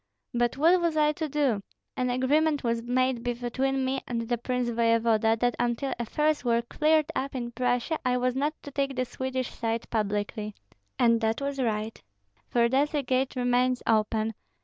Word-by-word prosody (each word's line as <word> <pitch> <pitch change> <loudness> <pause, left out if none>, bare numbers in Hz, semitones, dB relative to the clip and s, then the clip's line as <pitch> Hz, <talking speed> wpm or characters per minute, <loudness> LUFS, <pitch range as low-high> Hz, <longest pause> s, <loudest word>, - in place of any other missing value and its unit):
But 240 +1 +1
what 340 +5 +4
was 335 -2 0
I 300 0 +4
to 310 0 -4
do? 270 -8 +1 0.3
An 250 -1 0
agreement 290 +4 +2
was 230 -1 0
made 250 +1 0
between 250 +3 -1
me 265 +1 -1
and 235 -1 -2
the 240 +1 -1
prince 250 0 -1
voevoda, 230 -1 +2
that 245 0 +1
until 245 +3 0
affairs 300 +5 0
were 235 -1 +2
cleared 305 +5 +2
up 275 +1 -2
in 240 -2 -3
Prussia, 245 +5 0
I 250 0 +1
was 250 0 0
not 295 +3 0
to 285 - -8
take 275 -1 -1
the 255 0 0
Swedish 260 0 -3
side 230 0 -2
publicly. 210 -1 -2 0.4
And 230 -1 +3
that 220 0 0
was 280 0 -3
right, 220 -2 -2 0.5
for 235 -1 +3
thus 280 +5 +1
a 290 - 0
gate 260 +1 0
remains 250 0 +1
open. 220 0 +1
250 Hz, 175 wpm, -27 LUFS, 235-275 Hz, 0.5 s, what